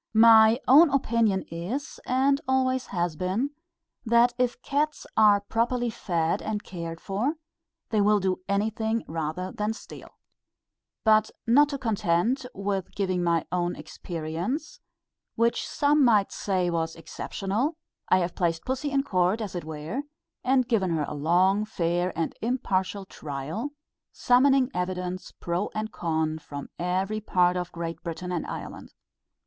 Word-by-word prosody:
My 225 +1 +7
own 295 +6 +8
opinion 230 -7 +1
is, 210 - -4
and 275 +2 +2
always 260 -1 +1
has 175 -3 -1
been, 190 - -1 0.5
that 235 +1 +4
if 250 -1 +1
cats 300 +2 -1
are 210 -2 +6
properly 235 +3 0
fed 170 -6 -1
and 215 -1 -3
cared 165 -2 -6
for, 220 +11 -1 0.6
they 215 -2 +3
will 210 +1 +4
do 185 -1 -1
anything 220 +2 0
rather 165 +3 -3
than 210 +1 -2
steal. - - -11 0.9
But 215 -1 +4 0.2
not 280 +4 +4
content 220 +2 0
with 195 -1 -3
giving 185 -3 0
my 170 -2 +1
own 175 0 0
experience, 175 - -5 0.6
which 235 0 +1
some 290 0 +3
might 215 -5 +4
say 185 -3 -1
was 165 -1 -1
exceptional, 200 - -3 0.3
I - - +6
have 175 0 -2
placed 165 -2 -1
pussy 265 +3 -2
in 275 -1 +1
court, 185 -2 +1
as 210 -4 -4
it 175 - -4
were, 160 - -4 0.4
and 255 -1 +3
given 210 -7 +1
her 150 - 0
a - - -5
long, 180 +7 +3
fair, 175 -3 -1
and 165 - -1
impartial 200 -5 -1
trial, 155 - -5 0.4
summoning 265 +1 +3
evidence 180 0 -3
pro 175 +4 -3
and 215 0 -3
con 160 -1 -1
from 145 -2 -8
every 190 +4 -1
part 180 -3 +2
of 180 -1 -3
Great 165 -1 -5
Britain 180 +2 -5
and 175 - -2
Ireland. - - -7
200 Hz, 140 wpm, -26 LUFS, 175-240 Hz, 0.9 s, own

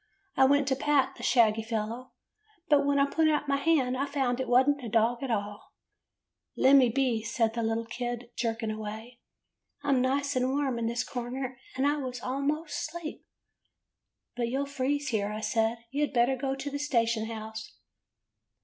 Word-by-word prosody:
I 265 - +6
went 285 0 +3
to 265 - +2
pat 275 -1 +2
the - - -11
shaggy 225 -3 +3
fellow, 225 +2 -4 0.6
but 285 -2 +4
when 285 0 +2
I 280 - +5
put 315 +2 +2
out 295 -1 0
my 275 0 +2
hand 275 -4 +2
I 275 +2 -1
found 265 -3 -1
it 260 - -2
was 255 +2 +4
n't 285 -2 +1
a 235 - -4
dog 230 +2 +2
at 270 - -3
all. 205 -2 -4 0.4
'' - - -59
'Lemme 265 -2 +6
be,' 250 -3 +1
said 225 0 0
the 235 - -2
little 225 0 -1
kid, 240 0 -5
jerking 225 -2 -2
away. 220 +3 -7 0.6
'I 285 - -2
'm 265 -2 +4
nice 280 +2 0
and 255 0 +1
warm 270 -3 0
in 230 - -1
this 235 +2 -1
corner, 255 +1 -5 0.2
and 265 +2 0
I 290 +1 +2
was 255 -3 -4
'most 290 +4 -2
asleep.' 330 -1 -7 0.6
" - - -58
'But 240 -1 -1
you 265 +4 -1
'll - - -1
freeze 280 +1 -1
here,' 210 -3 -1
I 215 +1 -5
said. 225 +1 0
'You 285 +2 -1
had 295 - 0
better 245 +2 +3
go 270 +1 -2
to 270 +1 -5
the 285 - -3
station 230 -6 +1
house. 220 -1 -7
255 Hz, 195 wpm, -29 LUFS, 230-280 Hz, 0.6 s, I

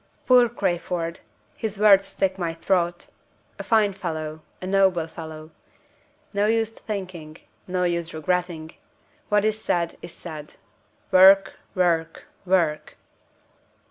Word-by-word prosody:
Poor 250 -2 +6
Crayford! 175 -5 -2 0.4
his 220 -2 -3
words 200 -2 +6
stick 190 -1 -1
in 190 - -11
my 165 -1 -2
throat. 175 0 -1 0.5
A - - -4
fine 215 -3 +3
fellow! 160 -4 -5 0.2
a - - -7
noble 190 -3 +2
fellow! 160 -1 -9 0.8
No 200 +1 +2
use 225 0 +1
thinking, 185 -8 -7 0.3
no 180 0 -1
use 170 -1 -1
regretting; 165 0 -2 0.6
what 210 0 +3
is 215 0 0
said, 170 -5 -1
is 170 - -9
said. 155 -3 -9 0.6
Work! 195 +1 +7 0.2
work! 165 -3 0 0.2
work!" 160 -5 +1
180 Hz, 120 wpm, -24 LUFS, 165-195 Hz, 0.8 s, Work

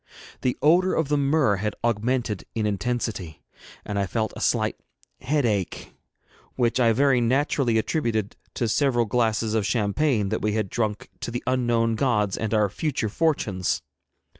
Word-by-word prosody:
The 125 - 0
odour 180 +5 +4
of 160 -3 0
the 150 - +2
myrrh 140 -7 +2
had 105 +2 -2
augmented 115 -1 0
in 110 -2 0
intensity, 105 -5 -3 0.4
and 100 -1 -2
I 100 - 0
felt 110 +2 -2
a - - -7
slight - - +1 0.4
headache, 120 - -1 0.6
which 120 0 +1
I 115 -2 +4
very 130 +1 +3
naturally 130 -1 +1
attributed 110 -4 -1 0.2
to 120 - 0
several 120 0 +2
glasses 110 -1 0
of 110 -2 +1
champagne 110 +1 +1
that - - -2
we 105 0 0
had 105 -3 -1
drunk 110 -3 -2
to - - -4
the 120 +1 -4
unknown 120 -3 +1
gods 105 -5 +1
and 110 -2 -3
our 105 -2 +3
future 120 - -2
fortunes. 105 - 0
115 Hz, 155 wpm, -25 LUFS, 105-130 Hz, 0.6 s, odour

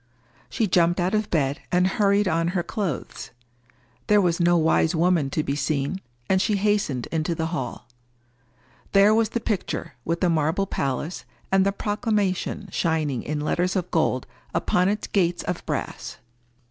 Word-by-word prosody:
She 225 - 0
jumped 175 -2 +2
out 180 +3 0
of 215 0 0
bed, 145 -2 0
and 180 0 +3
hurried 200 0 +2
on 170 +1 0
her 175 - 0
clothes. 185 - -4 0.8
There 210 0 +5
was 175 -3 +1
no 175 0 +4
wise 160 +1 +2
woman 165 -4 +2
to 155 +2 -1
be 140 - -2
seen; 145 +5 -1 0.3
and 190 0 +3
she 210 - +1
hastened 200 - 0
into 160 +1 -1
the 160 - -2
hall. 130 -5 -4 1.1
There 200 +2 +6
was 220 -1 +2
the 235 - -2
picture, 190 -7 -3
with 165 +4 -1
the 180 - +3
marble 160 +5 +1
palace, 140 +1 -3 0.3
and 195 0 +4
the - - +3
proclamation 205 -2 -1
shining 155 -8 0
in 150 0 -3
letters 180 +5 0
of 180 -2 -2
gold 155 -6 +1 0.3
upon 180 +1 +2
its 210 +1 -2
gates 175 -3 0
of 180 -1 -3
brass. - - -4
175 Hz, 160 wpm, -24 LUFS, 160-200 Hz, 1.1 s, There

